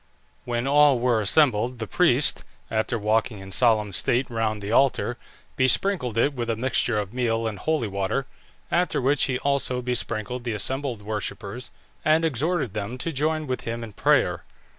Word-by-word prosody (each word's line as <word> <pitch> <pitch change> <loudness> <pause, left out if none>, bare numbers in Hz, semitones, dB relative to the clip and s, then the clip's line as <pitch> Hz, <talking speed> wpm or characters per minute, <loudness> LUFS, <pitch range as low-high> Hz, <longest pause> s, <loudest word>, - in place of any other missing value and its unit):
When 120 +1 -2
all 145 -1 +5
were 120 -2 +1
assembled, 120 0 +3
the 110 - -4
priest, 140 -2 +2 0.3
after 110 +2 0
walking 110 +1 0
in 95 0 -10
solemn 110 -3 +2
state 125 +8 +1
round 110 -2 -1
the 100 +1 -5
altar, 125 -1 +2 0.4
besprinkled 130 - +2
it 140 +5 +2
with 120 -3 -4
a 115 - +1
mixture 120 -1 +1
of 105 0 -3
meal 115 -2 0
and 105 -3 -4
holy 155 -4 0
water, 100 +7 -2 0.5
after 180 +1 +1
which 135 +2 +2
he 130 -2 -1
also 140 -2 0
besprinkled 120 -1 -2
the 120 -2 -2
assembled 125 +1 -2
worshippers, 105 +2 -5 0.3
and 155 +1 +3
exhorted 155 - -1
them 105 +4 -4
to 165 +6 -3
join 155 +2 -1
with 130 -2 -3
him 115 0 -5
in 110 - -8
prayer. - - +2
120 Hz, 165 wpm, -24 LUFS, 110-135 Hz, 0.5 s, all